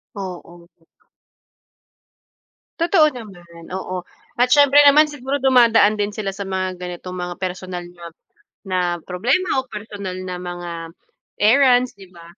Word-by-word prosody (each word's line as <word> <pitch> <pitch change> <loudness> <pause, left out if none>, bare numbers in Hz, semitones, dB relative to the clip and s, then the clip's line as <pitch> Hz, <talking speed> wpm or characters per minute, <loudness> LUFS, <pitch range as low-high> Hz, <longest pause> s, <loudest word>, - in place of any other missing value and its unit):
Oo. 175 -3 -9 2.1
Totoo 330 -3 +4
naman 175 - -12
oo, 185 -1 -5 0.4
at 245 - +4
siyempre 285 +1 +6
naman 300 +2 +6
siguro 280 0 -4
dumadaan 230 -5 +4
din 205 0 -1
sila 200 -2 -3
sa 195 0 -7
mga 185 -1 -3
ganitong 180 +1 -7
mga 180 0 -5
personal 185 -1 -5
na 175 -1 -13 0.6
na 185 -1 -1 0.3
problema 255 - 0
o 260 - -19
personal 205 -3 -7
na 180 -1 -5
mga 175 -1 -6 0.6
errands 250 +2 +4
di 190 - -13
ba, 170 -2 -16
195 Hz, 125 wpm, -20 LUFS, 180-250 Hz, 2.1 s, siyempre